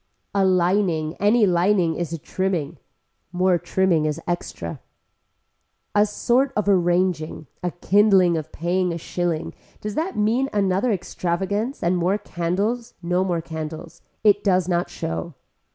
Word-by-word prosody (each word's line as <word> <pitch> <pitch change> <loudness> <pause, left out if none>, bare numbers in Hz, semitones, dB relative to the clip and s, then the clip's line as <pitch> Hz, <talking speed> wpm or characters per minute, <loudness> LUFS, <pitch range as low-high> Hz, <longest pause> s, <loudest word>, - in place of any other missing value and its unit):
A 200 -1 +2
lining 180 -3 +2
any 210 +2 +4
lining 180 -1 +2
is 170 -1 -4
a 165 - -3
trimming. 170 -2 -2 0.5
More 180 0 +2
trimming 180 -5 +1
is 150 - -2
extra. 175 0 -4 1.1
A 205 +1 +4
sort 250 +6 +1
of 210 -1 0
arranging, 175 -4 +1 0.2
a 180 - -1
kindling 190 0 +4
of 155 -1 -4
paying 180 +2 0
a 170 - -3
shilling, 170 -1 -2 0.3
does 210 0 -5
that 330 - -2
mean 230 +6 +1
another 200 +3 +1
extravagance 195 +5 -2
and 175 +2 +2
more 180 +4 +1
candles, 205 +7 -2
no 180 +2 +1
more 175 -3 -1
candles. 160 0 -7 0.2
It 205 -1 +4
does 185 -3 +2
not 175 -1 0
show. 80 0 -5
180 Hz, 135 wpm, -23 LUFS, 170-205 Hz, 1.1 s, any